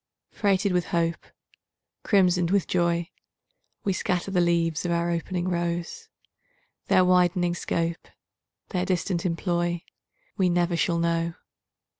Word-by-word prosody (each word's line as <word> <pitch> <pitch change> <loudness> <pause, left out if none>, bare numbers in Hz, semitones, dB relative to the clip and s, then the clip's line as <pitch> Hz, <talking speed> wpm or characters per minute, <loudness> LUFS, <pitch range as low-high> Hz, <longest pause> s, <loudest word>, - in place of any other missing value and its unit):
Freighted 200 -1 +1
with 180 -1 +1
hope, 170 0 -1 0.8
Crimsoned 180 -4 +3
with 200 -1 +2
joy, 170 -1 0 0.7
We 195 - +1
scatter 180 +1 -1
the 180 -2 +2
leaves 170 -2 +1
of 175 - -1
our 170 0 0
opening 175 +1 -2
rose; 170 -1 -3 0.8
Their 185 - +4
widening 180 -1 +3
scope, 170 -1 -2 0.6
Their 180 -2 -1
distant 180 -1 -1
employ, 175 0 -1 0.5
We 185 -2 +3
never 175 0 +1
shall 170 +1 +1
know. 170 0 0
175 Hz, 120 wpm, -26 LUFS, 170-180 Hz, 0.8 s, Their